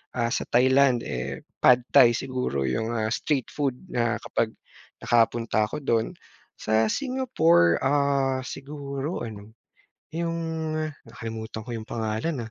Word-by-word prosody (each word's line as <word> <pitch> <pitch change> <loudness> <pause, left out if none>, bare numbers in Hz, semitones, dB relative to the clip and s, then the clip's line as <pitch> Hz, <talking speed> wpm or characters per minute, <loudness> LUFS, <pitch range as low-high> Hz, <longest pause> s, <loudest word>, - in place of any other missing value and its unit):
ah, 115 -1 0
sa - - -1
Thailand, 130 0 +4
eh, 65 +1 -4 0.2
Pad 125 -1 +6
Thai 125 -4 +7
siguro 125 - -2
yung, 65 - -1
ah, 110 -1 -1
street 135 +1 -1
food 140 -4 -1 0.2
na 115 -2 +1
kapag - - -1 0.5
nakapunta 115 -2 +2
ako 150 +4 -6
dun. 115 -4 0 0.4
Sa 110 +1 +1
Singapore, 170 - +2
ah, 135 -1 +2
siguro 140 +1 -5
ano 105 -1 -10 0.6
yung 165 +1 -2 0.7
nakalimutan 110 -1 -6
ko 120 - -8
yung 115 -1 -5
pangalan, 115 +4 -2
120 Hz, 125 wpm, -26 LUFS, 110-140 Hz, 0.7 s, Thai